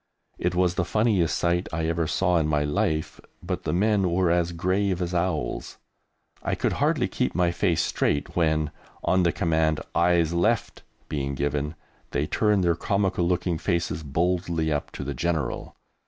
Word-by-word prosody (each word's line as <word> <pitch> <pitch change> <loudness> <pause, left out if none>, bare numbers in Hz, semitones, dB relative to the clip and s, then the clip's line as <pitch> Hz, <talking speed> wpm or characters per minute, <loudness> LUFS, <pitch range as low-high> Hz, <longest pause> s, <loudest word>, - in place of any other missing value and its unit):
It 90 0 0
was 90 -1 +2
the 90 - 0
funniest 100 -3 +1
sight 85 +1 0
I 80 0 -1
ever 80 0 0
saw 90 +2 +2
in 75 - +1
my 75 -1 +1
life, 75 +1 -1 0.2
but - - -4
the - - 0
men 100 0 +2
were 85 0 +2
as 85 0 +1
grave 95 +2 0
as 90 0 -2
owls. 85 -7 -2 0.6
I - - -1
could - - 0
hardly - - +2
keep - - -2
my 90 -1 +2
face 85 -2 +1
straight 70 - -1
when, 80 -3 +1 0.3
on 95 - +3
the 85 -1 +3
command 80 -2 +1
"eyes 85 -1 +3
left" 85 0 0 0.3
being 70 -2 -2
given, 75 +3 -1 0.3
they 70 - 0
turned 105 +3 +2
their 85 -1 +3
comical 95 -1 0
looking 90 -2 0
faces 85 -3 -1
boldly 85 +2 0
up 75 - -2
to - - -5
the 70 +1 -3
General! 80 +2 -2
85 Hz, 170 wpm, -25 LUFS, 80-90 Hz, 0.6 s, on